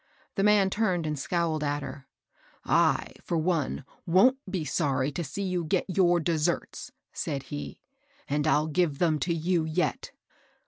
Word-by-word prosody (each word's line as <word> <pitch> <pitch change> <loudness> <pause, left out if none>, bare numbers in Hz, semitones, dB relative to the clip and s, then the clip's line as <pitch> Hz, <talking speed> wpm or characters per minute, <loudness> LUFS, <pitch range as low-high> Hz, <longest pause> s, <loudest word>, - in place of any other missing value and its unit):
The 195 - -1
man 200 -1 +4
turned 185 -6 0
and 150 -2 -2
scowled 165 0 -1
at 145 0 -1
her. 135 0 -8 0.3
" - - -32
I^ - - +2
for 170 - -2
one, 160 -5 -1 0.2
wont 210 +10 +5
be 185 -5 -2
sorry 135 -1 0
to 170 +5 -3
see 180 +7 -5
you 180 -2 -1
get 170 +4 0
your 175 -2 +3
deserts, 165 0 -1 0.2
said 140 -2 -3
he; 75 -1 -6 0.2
" - - -34
and 145 +2 0
I'll 155 0 +3
give 155 -2 0
them 160 -2 +2
to 170 +6 -1
you 165 +1 +1
yet." 160 +3 -1
165 Hz, 170 wpm, -28 LUFS, 150-180 Hz, 0.3 s, wont